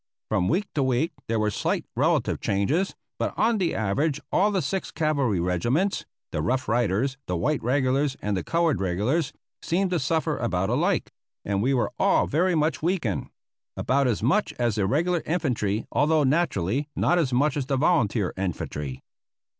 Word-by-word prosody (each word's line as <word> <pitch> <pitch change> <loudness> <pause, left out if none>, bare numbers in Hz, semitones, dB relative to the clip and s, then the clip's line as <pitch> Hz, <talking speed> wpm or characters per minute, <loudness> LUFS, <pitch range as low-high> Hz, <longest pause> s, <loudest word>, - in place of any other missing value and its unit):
From 90 - +1
week 190 +6 +1
to 150 - 0
week 130 +5 +1 0.2
there 115 - 0
were 105 -1 +1
slight - - -1
relative - - +1
changes, 140 - 0 0.2
but - - -1
on 225 -1 +2
the 180 -3 0
average 135 +8 0
all 200 +3 +3
the 200 -2 0
six 185 +8 -2
cavalry 140 - 0
regiments, 120 - 0 0.2
the 75 - -1
Rough 130 - 0
Riders, 120 +4 0
the 90 - -1
white 150 - 0
regulars, 135 +2 +1
and 105 -1 -1
the 90 - -2
colored 165 - +1
regulars 115 - 0 0.3
seemed 185 +2 0
to 175 - +1
suffer 155 +2 0
about 95 -5 0
alike, - - +1 0.3
and 100 -1 0
we 135 +4 +2
were 120 - 0
all - - +3
very 175 +4 +1
much 155 -3 +1
weakened; 165 - -1 0.5
about 135 +1 +2
as 110 -3 -1
much 150 - +2
as 120 -5 0
the 100 -2 0
regular 170 - +1
infantry, 120 - 0
although 155 +1 +3
naturally 140 - 0
not 175 - +2
as 145 -6 +1
much 140 +3 +2
as 140 -3 -2
the 135 -1 +1
volunteer 125 - +2
infantry. 75 -7 -4
135 Hz, 170 wpm, -25 LUFS, 105-160 Hz, 0.5 s, all